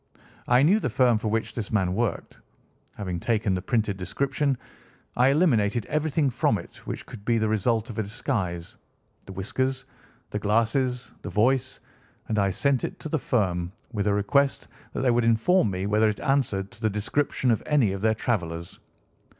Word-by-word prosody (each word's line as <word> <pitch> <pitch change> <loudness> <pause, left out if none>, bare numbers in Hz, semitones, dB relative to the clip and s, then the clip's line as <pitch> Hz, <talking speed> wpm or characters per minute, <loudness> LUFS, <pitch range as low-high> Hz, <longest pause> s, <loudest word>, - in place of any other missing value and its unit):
I 125 +2 +5
knew 190 +8 +5
the - - -1
firm 120 -4 +3
for 110 - -3
which 110 +1 -1
this 115 -4 -5
man 95 -4 +1
worked. 115 +2 -2 0.6
Having 90 -4 -4
taken 110 -1 0
the 90 - -1
printed 105 -1 0
description. 135 - -1 0.6
I 125 +1 +4
eliminated 120 - +2
everything 150 -1 0
from - - +1
it - - -11
which - - -5
could 100 - -11
be 115 +1 +2
the 110 -1 +1
result 110 +2 +1
of 110 - -6
a - - +3
disguise—the 95 -3 -5
whiskers, 130 +8 -2 0.5
the 105 - -2
glasses, 115 +4 +1
the - - -6
voice, 130 +4 +1 0.5
and 110 - 0
I 100 -1 +3
sent 135 +6 +1
it - - -4
to 155 - -5
the 160 - 0
firm, 90 -8 0 0.2
with 105 -2 -1
a 105 - +3
request 140 +7 +1 0.3
that - - -2
they 130 -2 +3
would 120 0 +2
inform 115 - +3
me 95 0 -3
whether 105 +2 +3
it 105 - -3
answered 115 -8 0
to 120 -2 -15
the 110 - +2
description 125 +5 0
of 110 - +1
any 140 -9 +3
of 95 0 -4
their 110 0 +2
travellers. 85 -8 -3
110 Hz, 180 wpm, -26 LUFS, 100-130 Hz, 0.6 s, I